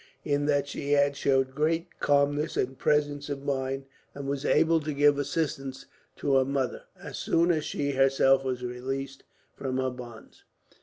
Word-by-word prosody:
In 145 -1 0
that 145 -1 +2
she 145 0 -2
had 140 0 +3
showed 135 -1 +1
great 160 +4 -1
calmness 145 +2 +2
and 130 +1 0
presence 145 -1 +1
of 140 -1 -4
mind, 135 -1 -2 0.3
and 140 -1 -6
was 140 +1 -2
able 165 +1 +4
to 155 0 -4
give 145 0 +4
assistance 140 -2 -3 0.3
to 140 -1 +2
her 130 - +4
mother, 135 -1 -2
as - - -7
soon 170 +1 +2
as 155 -3 0
she 140 -1 -2
herself 135 0 +4
was 130 -2 -3
released 135 +2 -4 0.3
from 130 -1 -3
her 130 0 0
bonds." 120 -3 -11
140 Hz, 165 wpm, -28 LUFS, 135-145 Hz, 0.3 s, able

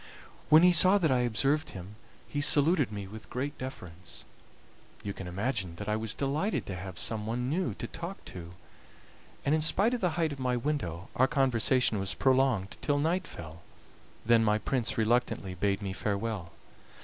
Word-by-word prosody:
When 155 +3 +8
he 180 - +7
saw 185 +4 +6
that 165 -7 +2
I 130 - +3
observed 135 +6 +1
him 95 +3 -9 0.3
he 145 - -2
saluted 145 - +4
me 100 -2 -5
with 110 +3 -11
great 135 +4 -3
deference. 95 -9 -8 0.8
You 100 - -4
can 95 -2 -8
imagine 95 -1 -2
that 105 - -7
I 105 - +1
was 110 -1 -3
delighted 150 +10 -1
to 95 - -5
have 90 -1 -7
some 110 -2 -1
one 125 +3 -2
new 180 +3 -1
to - - -5
talk 170 +3 -7
to, 85 -2 -9 0.9
and 140 - +2
in 155 - +2
spite 200 +9 +2
of 245 - -2
the 175 -3 0
height 165 -3 +1
of 140 - -7
my 125 -1 0
window 115 - -3
our 130 - +4
conversation 130 -5 +2
was 95 0 -2
prolonged 130 -7 +2
till 145 -1 +1
night 170 +6 0
fell, 85 0 -10 0.6
then 115 0 +5
my 105 -1 +3
prince 120 +2 -1
reluctantly 110 -4 +1
bade 100 +3 -1
me 95 -1 -3
farewell. 100 -3 -3
120 Hz, 180 wpm, -30 LUFS, 100-145 Hz, 0.9 s, When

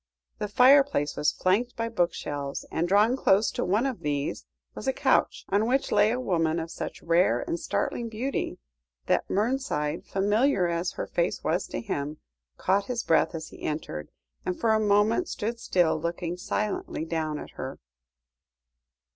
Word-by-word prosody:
The 210 - -1
fireplace 250 - +4
was 150 - +2
flanked 215 +7 +1
by 230 0 -2
bookshelves, 155 -9 -2
and 165 +2 0
drawn 210 +6 +4
close 210 -4 +3
to - - -2
one 210 +7 +1
of 260 -4 -2
these 145 -1 -2 0.3
was - - -7
a 265 - +2
couch, - - +1
on 205 +3 +2
which 270 +3 +1
lay 210 - +5
a 245 +3 0
woman 165 -7 +1
of 165 0 -5
such - - -6
rare 170 +2 +3
and 335 +3 -3
startling 240 -7 -2
beauty, 245 +5 -3 0.5
that - - +1
Mernside, 210 - -1
familiar 205 +2 +2
as 170 +1 -1
her - - -4
face - - -1
was - - 0
to - - -4
him, 150 -7 -3 0.4
caught 195 +2 +1
his 245 -2 -2
breath 165 - +2
as 160 -1 -6
he - - -14
entered, 150 - -4 0.3
and 180 - -3
for 225 -1 +3
a 220 - +3
moment 215 - +3
stood 230 +1 -3
still, 170 -7 +1
looking 170 +1 -3
silently 195 -2 -3
down 160 -2 -2
at - - -8
her. - - -6
200 Hz, 165 wpm, -27 LUFS, 165-235 Hz, 0.5 s, lay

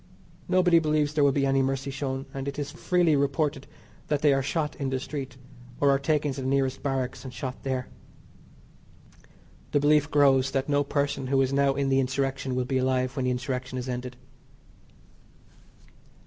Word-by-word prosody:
Nobody 180 -2 +4
believes 150 -2 +1
there 150 -1 +2
will 140 - +5
be 140 0 +1
any 135 0 +2
mercy 135 +1 -1
shown, 135 -1 -3
and 135 0 -5
it 140 - -4
is 145 -1 -4
freely 175 -4 +2
reported 140 0 0 0.4
that 150 -1 -1
they 145 -2 +5
are 135 - +1
shot 150 +2 -2
in 135 -2 -2
the 130 0 -1
street, 135 -2 -6 0.4
or 140 -1 +4
are 135 - +2
taken 145 0 0
to 135 - -6
the 130 - -3
nearest 135 -1 0
barracks 135 -2 -2
and 130 - -7
shot 130 -1 -6
there. 130 -2 -2 1.9
The 145 - +4
belief 145 0 +3
grows 135 -3 +4
that 135 0 -1
no 145 -1 +2
person 140 -2 -1
who 135 +1 +2
is 130 +1 -1
now 140 0 +2
in 140 0 0
the 135 0 +3
Insurrection 135 0 -1
will 125 0 0
be 130 +1 0
alive 130 0 0
when 130 - -1
the 125 - +1
Insurrection 125 0 -3
is 125 0 -4
ended. 125 0 -5
135 Hz, 185 wpm, -27 LUFS, 130-145 Hz, 1.9 s, will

